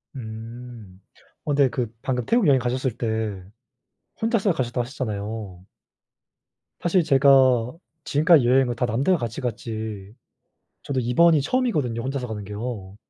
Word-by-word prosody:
음. 115 -3 -9 0.4
어 145 - -1
근데 140 -2 +4
그 120 -2 -3
방금 125 -3 -2
태국 230 -6 +2
여행 135 -2 +5
가셨을 125 0 -2
때 110 -5 -2 0.8
혼자서 220 -3 +2
가셨다고 125 -4 -2
하셨잖아요. 105 -6 -5 1.2
사실 175 +1 +2
제가 135 -4 +4 0.3
지금까지 155 -2 +4
여행을 125 0 +3
다 125 - +1
남들과 135 - +1
같이 120 +2 -4
갔지 110 -4 -5 0.7
저도 135 -2 -2
이번이 150 +6 +4
처음이거든요. 150 - 0
혼자서 135 -1 -3
가는 105 -3 -5
게요. 105 -1 -6
125 Hz, 295 characters per minute, -23 LUFS, 110-140 Hz, 1.2 s, 여행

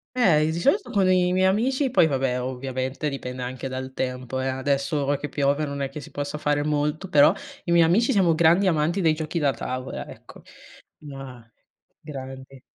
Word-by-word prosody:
Eh, 180 -12 +4
i 155 - +1
di 165 - -3
solito 380 - +1
con 195 -2 +2
i 180 -1 +3
miei 185 +1 +2
amici 255 +8 +1
poi 240 -9 +4
vabbè, 130 -4 0
ovviamente 130 +2 -3
dipende 125 -3 -5
anche 130 +1 -5
dal 130 0 -6
tempo, 130 0 -3
eh. 135 - -2
Adesso, 140 +2 -1
ora 140 0 +1
che 150 - -6
piove, 145 +1 0
non 140 -1 -5
è 135 - 0
che 140 +3 -8
si - - -12
possa 145 +1 -4
fare 145 -1 0
molto. 150 +4 -1
Però 145 -5 +5 0.3
i 170 - -3
miei 170 -1 +6
amici 225 +10 +3
siamo 180 -7 +3
grandi 170 +4 +4
amanti 165 +3 +1
dei 160 -4 +3
giochi 155 +2 -3
da 140 -3 +2
tavola, 130 0 -5
ecco. - - -13 0.6
Ma 135 -5 -10 0.5
grandi. 135 -2 -9
145 Hz, 195 wpm, -24 LUFS, 130-170 Hz, 0.6 s, miei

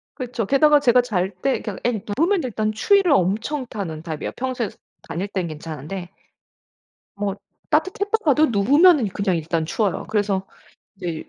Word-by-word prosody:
그렇죠. 250 -4 -3
게다가 295 +6 +5
제가 250 -3 +4
잘 190 -6 -1
때 270 - 0
그냥 210 -4 -6
앵 235 -4 0 0.2
누우면 350 +3 +2
일단 215 -3 -1
추위를 360 - +3
엄청 225 - +1
타는 170 -9 -5
타입이에요. 160 -3 -4
평소에 250 -4 -2
스 - - -19 0.3
다닐 170 +4 -3
땐 190 -4 -3
괜찮은데. 160 +3 -7 1.1
뭐 200 -1 -3 0.3
따뜻했다가도 375 - +2
누우면은 275 - +4
그냥 195 -2 -1
일단 165 0 -1
추워요. 200 +4 -1
그래서 200 -3 0 0.6
인제 170 -3 -4
215 Hz, 340 characters per minute, -22 LUFS, 185-285 Hz, 1.1 s, 게다가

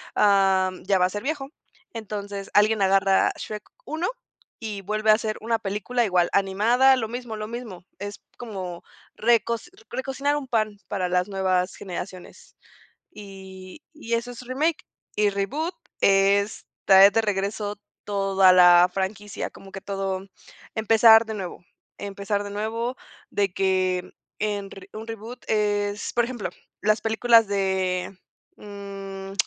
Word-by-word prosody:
am, 190 -2 +3
ya 195 - +2
va 180 - +4
a 185 - 0
ser 205 +2 -5
viejo. 275 -1 -3 0.4
Entonces, 205 -3 -6
alguien 210 0 +4
agarra 195 0 +4
Shrek 210 -1 -6 0.2
1 320 +3 -2 0.5
y 210 -3 -5
vuelve 215 +2 +1
a - - +8
hacer 215 0 -1
una 225 0 -1
película 215 +4 -1
igual 180 -4 +2
animada, 225 +7 +4
lo 230 -4 -2
mismo, 240 -1 -6
lo 215 - -5
mismo. 220 -7 -8
Es 205 0 -6 0.2
como 190 -7 -6 0.3
recos 235 +5 +1 0.2
recocinar 275 +2 -1
un 290 -2 -4
pan 215 -4 -1
para 190 -3 -1
las 180 +1 +1
nuevas 190 -1 0
generaciones, 185 -1 -8 0.6
y 190 - -11
y 235 -7 -8
eso 235 +1 0
es 245 - -9
remake. 285 +6 -1 0.3
Y 210 -1 +3
reboot, 280 - -2 0.3
es 200 +1 +3 0.2
traer 195 +1 +8
de 225 - +2
regreso 205 0 -2 0.2
toda 195 -2 +4
la 175 -1 +7
franquicia, 200 +2 -3
como 195 0 -14
que 195 - -7
todo 195 -1 -3 0.5
empezar 225 0 +6
de 220 - -4
nuevo, 185 -3 -7 0.3
empezar 200 0 -3
de 205 - -6
nuevo 225 +4 -3 0.3
de 200 -2 0
que 185 -1 0 0.3
en 205 -2 -2
re 195 -1 -12
un 220 +1 -8
reboot 225 +2 -8
es, 205 -1 0
por 240 -1 +3
ejemplo, 240 -3 -4 0.3
las 215 +1 +2
películas 225 0 +4
de, 190 -1 -1 0.4
mm, 195 -1 -8
205 Hz, 140 wpm, -24 LUFS, 195-225 Hz, 0.6 s, a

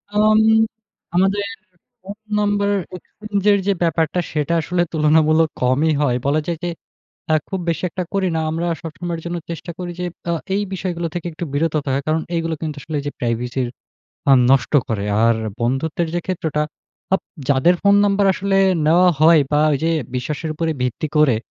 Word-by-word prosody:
আম 215 +1 +5 0.8
আমাদের 195 +3 +2 0.6
phone 200 +2 -9 0.2
number 205 -1 +1 0.3
exchange 205 +2 -5
এর 200 - +4
যে 200 - +4
ব্যাপারটা 165 +1 +1
সেটা 150 +1 -1
আসলে 175 +2 -1
তুলনামূলক 155 +1 +3
কমই 140 +5 +2
হয়। 125 -4 +2
বলা 145 +3 +2
যায় 170 -2 -1
যে 175 - -1 0.6
আ - - +5
খুব 190 -2 -3
বেশি 165 0 -1
একটা 180 - -3
করি 195 -1 +1
না। - - 0
আমরা 165 +2 -2 0.2
সবসময়ের 170 +1 -5
জন্য 175 0 -3
চেষ্টা 170 +1 -6
করি 180 -1 -4
যে - - -2 0.3
আ - - +1 0.2
এই 205 - +1
বিষয়গুলো 175 -2 -3
থেকে 175 -1 -4
একটু 165 +2 -5
বিরত 160 +2 0
থাকা। 135 0 0
কারণ 160 +1 +1
এইগুলো 165 -1 -1
কিন্তু 155 -2 -3
আসলে 155 -2 -4
এই - - -10
যে - - -1
প্রাইভেসির 120 +1 -1 0.6
আ - - +8 0.2
নষ্ট 135 0 +3 0.2
করে। 105 -3 -2 0.2
আর 115 0 +4 0.3
বন্ধুত্বের 150 +7 -1
যে 175 - 0
ক্ষেত্রটা 160 -5 -1 0.5
আপ 195 - +1 0.3
যাদের 140 +6 +4
ফোন 200 0 +5
নাম্বার 200 0 +2
আসলে 195 0 0 0.3
নেওয়া 180 +3 +5
হয় 160 0 +7
বা 150 - +4
ওই 140 - +1
যে 165 - +2 0.2
বিশ্বাসের 150 +5 -3
উপরে 165 +1 -1
ভিত্তি 125 +5 -2
করে, 150 -7 +4
165 Hz, 175 wpm, -20 LUFS, 150-180 Hz, 0.8 s, আ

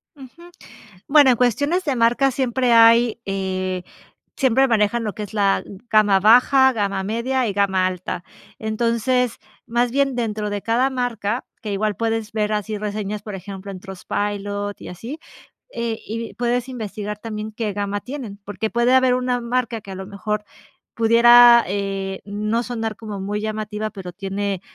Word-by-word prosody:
Ujú, 275 +4 -14 0.7
bueno, 285 -2 +6
en 245 - +3
cuestiones 285 - +1
de 280 -4 0
marca 240 +4 +3
siempre 255 -1 0
hay, 230 0 +6
eh, 185 -1 -2 0.5
siempre 265 0 +3
manejan 225 0 +2
lo 210 - -2
que 210 - -5
es 205 - -11
la 200 -2 +2 0.3
gama 210 -3 +4
baja, 250 +5 +6
gama 200 -4 -1
media 235 +5 -1
y - - -1
gama 190 -2 +2
alta. 180 -1 -4 0.4
Entonces, 235 +2 0 0.3
más 240 +1 +1
bien 275 +1 +1
dentro 215 -3 -2
de 205 -1 -3
cada 240 +4 +2
marca, 245 -3 -2 0.2
que 215 -4 -5
igual 205 0 -1
puedes 225 0 -2
ver 215 -1 -1
así 210 0 -2
reseñas, 210 0 -4
por 210 -1 -7
ejemplo, 195 +1 -8
en 185 - -9
Trustpilot, 205 +1 -4
y - - -9
así, 235 - -7 0.5
eh, 230 -1 -3
y 230 +2 -5
puedes 245 +1 -1
investigar 210 -4 -5
también 215 -1 -6
qué 215 -1 -3
gama 205 0 -3
tienen, 245 -6 -7
porque 205 +2 -3
puede 240 +2 +2
haber 260 -1 +4
una 250 -1 0
marca 235 -1 -2
que 200 - -11
a - - -6
lo 190 0 -7
mejor 210 +1 -3 0.5
pudiera, 235 +1 +7
eh, 195 0 -3
no 215 +3 -1
sonar 225 -3 -3
como 210 -1 -7
muy 205 +2 -2
llamativa, 215 0 -3
pero 185 -3 -8
tiene 195 0 -3
220 Hz, 160 wpm, -21 LUFS, 205-240 Hz, 0.7 s, pudiera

